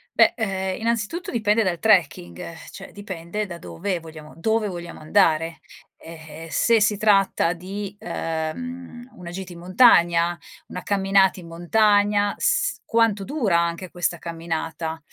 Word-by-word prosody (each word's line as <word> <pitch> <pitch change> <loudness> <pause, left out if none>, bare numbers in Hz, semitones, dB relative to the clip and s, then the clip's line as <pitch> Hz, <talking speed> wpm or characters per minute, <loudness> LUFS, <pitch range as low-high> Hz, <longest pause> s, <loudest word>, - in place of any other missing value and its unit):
Beh, - - +5
ehm, 190 -4 -2
innanzitutto 235 - -2
dipende 215 -1 +2
dal 180 -3 -1
trekking, 160 - +2 0.3
cioè - - -11
dipende 200 0 -5
da 175 -3 -8
dove 185 +1 -4
vogliamo 155 -2 -12
dove 220 +5 0
vogliamo 175 -3 -7
andare, 165 -1 +2 0.4
ehm, 160 -1 -11
se 230 +6 +3
si 205 0 +2
tratta 195 -5 +3
di, 195 +3 -7
uhm, 240 +11 -5
una 175 -1 -9
gita 180 0 -7
in 170 - -11
montagna, 175 -3 +4 0.3
una 180 - -7
camminata 195 -1 +2
in 170 - -11
montagna, 205 +4 +2
s - - +1
quanto 225 -3 +1
dura 225 - +1
anche 170 +2 -2
questa 175 -1 -1
camminata, 165 -1 -4
185 Hz, 135 wpm, -23 LUFS, 170-210 Hz, 0.4 s, Beh